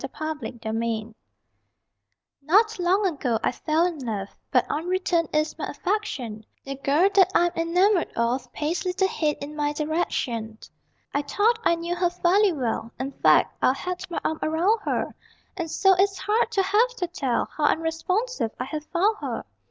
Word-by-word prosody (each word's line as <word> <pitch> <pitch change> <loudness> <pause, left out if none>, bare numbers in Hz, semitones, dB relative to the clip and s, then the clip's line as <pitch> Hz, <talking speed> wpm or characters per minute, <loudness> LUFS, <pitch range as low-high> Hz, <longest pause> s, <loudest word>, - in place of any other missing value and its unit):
LOVE 310 0 -2
AT 230 +1 -7
FIRST 220 0 -2
SIGHT 225 -1 -2 1.3
Not 410 +9 +3
long 370 +4 +2
ago 275 -10 0
I - - +2
fell 315 +2 +1
in 345 -4 -2
love, 210 -6 -4 0.2
But - - +3
unreturned 345 +1 0
is 305 0 0
my - - -2
affection 260 - -3 0.2
The 275 - -4
girl 280 +6 +2
that 380 -2 +5
I'm 345 0 +4
enamored 355 +3 +2
of 245 +2 -1
Pays 310 +4 -2
little 375 +1 +1
heed 305 -5 -1
in 295 +1 -7
my 295 -1 0
direction. 265 -8 -2 0.6
I 285 - +1
thought 420 +11 +1
I 340 - +4
knew 340 +1 -3
her 355 0 +2
fairly 365 +3 +3
well: 235 -6 -2
In 265 +2 -3
fact, - - +3
I'd 260 - +3
had 360 +2 -4
my 340 - -2
arm 315 - -1
around 345 +8 +2
her; - - -1 0.4
And 340 -3 -4
so 385 +4 +4
it's 390 +1 +2
hard 430 +3 +1
to 390 -3 +3
have 420 +6 +3
to 365 - -2
tell 280 -8 -1
How 300 - +1
unresponsive 330 - 0
I - - -1
have 305 +2 -5
found 395 +7 +1
her. - - -4
330 Hz, 175 wpm, -25 LUFS, 275-375 Hz, 1.3 s, that